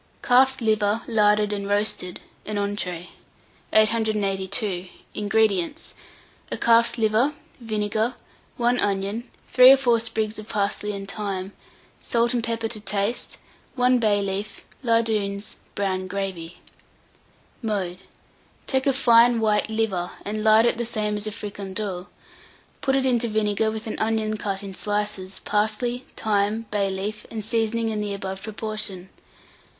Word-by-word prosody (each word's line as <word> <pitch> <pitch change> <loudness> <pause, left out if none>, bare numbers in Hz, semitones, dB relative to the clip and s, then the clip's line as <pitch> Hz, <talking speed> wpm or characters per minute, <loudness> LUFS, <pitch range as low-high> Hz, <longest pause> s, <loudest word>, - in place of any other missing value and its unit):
CALF'S 265 +1 +4
LIVER 215 -1 +1
LARDED 210 -2 +3
AND 200 -1 -3
ROASTED 205 -3 +1 0.3
(an 210 -1 -2
Entree). 185 -4 -3 0.6
882. 205 -3 +1 0.3
INGREDIENTS. 210 - 0 0.6
A - - -2
calf's 235 +1 +4
liver, 225 +6 +2 0.2
vinegar, 220 +1 -1 0.4
1 245 +1 +2
onion, 200 +4 -1 0.2
3 255 +1 +9
or - - +5
4 240 -3 +3
sprigs 220 -1 -3
of 215 - -10
parsley 210 0 -1
and 195 -1 -6
thyme, 195 -2 -4 0.5
salt 235 0 +1
and 240 -2 0
pepper 230 0 -1
to 220 -1 -5
taste, 210 +3 -1 0.4
1 250 0 +3
bay 205 -3 +2
leaf, 200 +1 -4 0.2
lardoons, 215 -4 0 0.2
brown 190 -2 -1
gravy. 185 -3 -4 1.0
Mode. 195 -6 -2 0.7
Take 265 0 0
a 275 - +4
fine 240 -2 +5
white 215 -1 +1
liver, 210 -5 -1 0.2
and 215 +1 -3
lard 220 +1 +6
it 235 - +2
the - - 0
same 215 -2 -1
as 210 +1 -3
a - - -2
fricandeau; 200 -3 -5 0.7
put 270 0 +1
it 270 -1 +2
into 240 -2 +2
vinegar 215 0 +1
with 220 0 -5
an 220 - -4
onion 220 -1 0
cut 200 -2 -3
in 195 -1 -6
slices, 205 -1 -2
parsley, 220 +4 -1
thyme, 215 +1 0
bay 200 -2 +1
leaf, 200 +3 -4
and 220 -2 -5
seasoning 225 0 0
in 215 -1 -2
the 205 -1 -2
above 190 -1 -5
proportion. 215 -3 -4
215 Hz, 135 wpm, -24 LUFS, 200-230 Hz, 1.0 s, 3